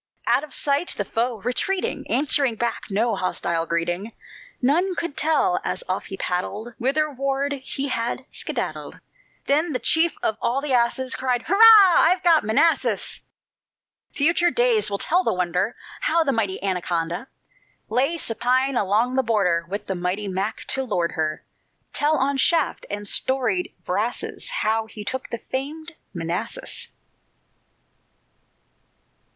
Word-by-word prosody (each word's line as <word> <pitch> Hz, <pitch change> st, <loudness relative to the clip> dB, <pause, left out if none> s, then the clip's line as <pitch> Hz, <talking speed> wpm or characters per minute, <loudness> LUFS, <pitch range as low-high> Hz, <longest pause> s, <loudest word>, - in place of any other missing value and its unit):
Out -, -, +3 dB
of 305 Hz, -, -9 dB
sight, 285 Hz, +6 st, -1 dB
the 205 Hz, -, -1 dB
foe, 230 Hz, +1 st, -2 dB
retreating, 360 Hz, -, -2 dB
Answered 275 Hz, -4 st, +2 dB
back 235 Hz, +1 st, -2 dB
no 220 Hz, +3 st, +1 dB
hostile 170 Hz, -3 st, -2 dB
greeting; 175 Hz, +6 st, -2 dB, 0.5 s
None 345 Hz, +9 st, +2 dB
could 340 Hz, -5 st, -4 dB
tell, 355 Hz, +4 st, +2 dB
as -, -, -3 dB
off -, -, -2 dB
he 195 Hz, -, -7 dB
paddled, 205 Hz, +7 st, -3 dB
Whitherward 275 Hz, 0 st, -1 dB
he 275 Hz, +1 st, -4 dB
had 240 Hz, +1 st, -2 dB
skedaddled. -, -, -4 dB, 0.5 s
Then 305 Hz, +3 st, +1 dB
the 250 Hz, -, -1 dB
chief 320 Hz, +7 st, +2 dB
of 220 Hz, 0 st, 0 dB
all 245 Hz, +3 st, +1 dB
the 280 Hz, -1 st, -2 dB
asses 250 Hz, +2 st, +1 dB
Cried: 250 Hz, -2 st, -1 dB
"Hurrah! 395 Hz, +4 st, +2 dB, 0.4 s
I've 360 Hz, +2 st, +3 dB
got 335 Hz, -3 st, +5 dB
Manassas." 290 Hz, +10 st, +1 dB, 0.9 s
Future 335 Hz, +4 st, +2 dB
days 235 Hz, -7 st, +3 dB
will 200 Hz, -, -1 dB
tell 355 Hz, -, +2 dB
the -, -, 0 dB
wonder, 180 Hz, +4 st, 0 dB, 0.2 s
How 335 Hz, -10 st, +2 dB
the 280 Hz, -, +1 dB
mighty 215 Hz, -6 st, -1 dB
Anaconda 175 Hz, +2 st, -2 dB, 0.6 s
Lay 275 Hz, +7 st, +1 dB
supine 255 Hz, +1 st, +1 dB
along 220 Hz, +4 st, +1 dB
the 265 Hz, -, +3 dB
border, 190 Hz, -8 st, +1 dB
With 205 Hz, +2 st, -4 dB
the 195 Hz, -, -2 dB
mighty 180 Hz, +3 st, -2 dB
Mac 195 Hz, +2 st, -2 dB
to 265 Hz, -, +1 dB
lord 180 Hz, -9 st, -1 dB
her: 155 Hz, -1 st, -3 dB, 0.5 s
Tell 300 Hz, +2 st, +2 dB
on 275 Hz, +1 st, +1 dB
shaft 320 Hz, +2 st, +1 dB
and 205 Hz, 0 st, -4 dB
storied 270 Hz, -, 0 dB
brasses -, -, -2 dB
How 225 Hz, -, 0 dB
he 210 Hz, -1 st, -9 dB
took 260 Hz, +5 st, -4 dB
the 235 Hz, -, -3 dB
famed 300 Hz, +8 st, -5 dB, 0.2 s
Manassas. 175 Hz, -, -4 dB
250 Hz, 140 wpm, -23 LUFS, 205-290 Hz, 0.9 s, got